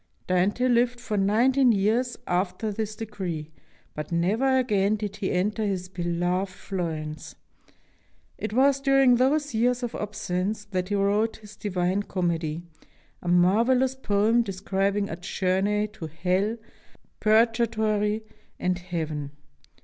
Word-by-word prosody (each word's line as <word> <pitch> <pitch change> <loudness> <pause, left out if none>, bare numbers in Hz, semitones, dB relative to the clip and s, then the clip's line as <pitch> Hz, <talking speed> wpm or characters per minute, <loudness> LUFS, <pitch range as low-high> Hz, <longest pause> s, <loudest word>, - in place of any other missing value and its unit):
Dante 190 +7 +1
lived 245 0 +2
for 230 -3 -4
nineteen 240 +6 +4
years 225 +5 +1
after 185 +4 -1
this 215 +1 -3
decree, 185 -8 -5 0.4
but 150 +1 -6
never 215 +11 +2
again 210 -5 +2
did 205 -1 -5
he 200 -2 -2
enter 210 +5 0
his 185 -3 -2
beloved 175 +1 -1
Florence. 160 -5 -5 1.0
It 215 - -3
was 275 +4 +3
during 270 -3 +5
those 290 +3 +1
years 245 +2 +1
of 240 - -3
absence 205 0 -3
that 185 -2 -3
he 205 - 0
wrote 205 +3 +1
his 210 -1 -13
"Divine 185 -1 -1
Comedy," 170 -4 -2 0.6
a - - -8
marvelous 230 +9 +3
poem 225 -2 +2
describing 195 0 -1
a 165 - -5
journey 190 +3 0
to 190 -6 -8
hell, 185 +7 0 0.6
purgatory, 220 -1 +2 0.4
and 180 0 0
heaven. 160 -5 -4
205 Hz, 125 wpm, -26 LUFS, 180-225 Hz, 1.0 s, during